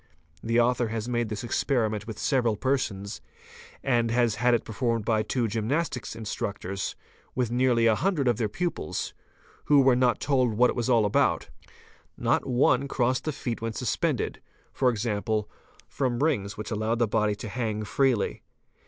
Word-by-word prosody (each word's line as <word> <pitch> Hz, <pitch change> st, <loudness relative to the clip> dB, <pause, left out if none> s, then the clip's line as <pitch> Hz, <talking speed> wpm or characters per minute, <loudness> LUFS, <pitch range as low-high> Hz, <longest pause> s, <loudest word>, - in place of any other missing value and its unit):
The 115 Hz, +1 st, +1 dB
author 120 Hz, 0 st, +2 dB
has 110 Hz, 0 st, -3 dB
made 120 Hz, -2 st, -1 dB
this 110 Hz, +1 st, -4 dB
experiment 110 Hz, -3 st, 0 dB
with 110 Hz, -2 st, -6 dB
several 120 Hz, -6 st, +1 dB
persons 105 Hz, -6 st, -2 dB, 0.6 s
and 120 Hz, -3 st, +2 dB
has 120 Hz, -1 st, +2 dB
had 120 Hz, +2 st, +3 dB
it; 115 Hz, -, -1 dB
performed 115 Hz, -1 st, -1 dB
by 110 Hz, -2 st, +2 dB
two 115 Hz, +2 st, -1 dB
gymnastic 115 Hz, +3 st, -1 dB
instructors 100 Hz, -3 st, -4 dB, 0.4 s
with 125 Hz, -3 st, 0 dB
nearly 120 Hz, -1 st, +3 dB
a 115 Hz, -, +5 dB
hundred 150 Hz, -, 0 dB
of 120 Hz, -3 st, +3 dB
their 110 Hz, -3 st, 0 dB
pupils, 170 Hz, -, -3 dB, 0.5 s
who 145 Hz, -1 st, +6 dB
were 130 Hz, -2 st, +5 dB
not 125 Hz, -1 st, +2 dB
told 130 Hz, -6 st, +1 dB
what 125 Hz, +3 st, +4 dB
it -, -, -6 dB
was 120 Hz, 0 st, -1 dB
all 115 Hz, -4 st, +4 dB
about; 105 Hz, -, +1 dB, 0.7 s
not -, -, +1 dB
one 130 Hz, +1 st, +3 dB
crossed 130 Hz, -1 st, 0 dB
the 155 Hz, -, 0 dB
feet 120 Hz, -5 st, -4 dB
when 115 Hz, 0 st, -3 dB
suspended, -, -, -1 dB, 0.4 s
e.g., 115 Hz, -4 st, +1 dB, 0.7 s
from 130 Hz, -1 st, -1 dB
rings 105 Hz, -11 st, 0 dB
which 105 Hz, +3 st, -6 dB
allowed 110 Hz, +2 st, 0 dB
the 120 Hz, -1 st, +2 dB
body 105 Hz, 0 st, +1 dB
to 105 Hz, -, -7 dB
hang 110 Hz, 0 st, -2 dB
freely. 125 Hz, 0 st, +1 dB
120 Hz, 160 wpm, -27 LUFS, 110-125 Hz, 0.7 s, who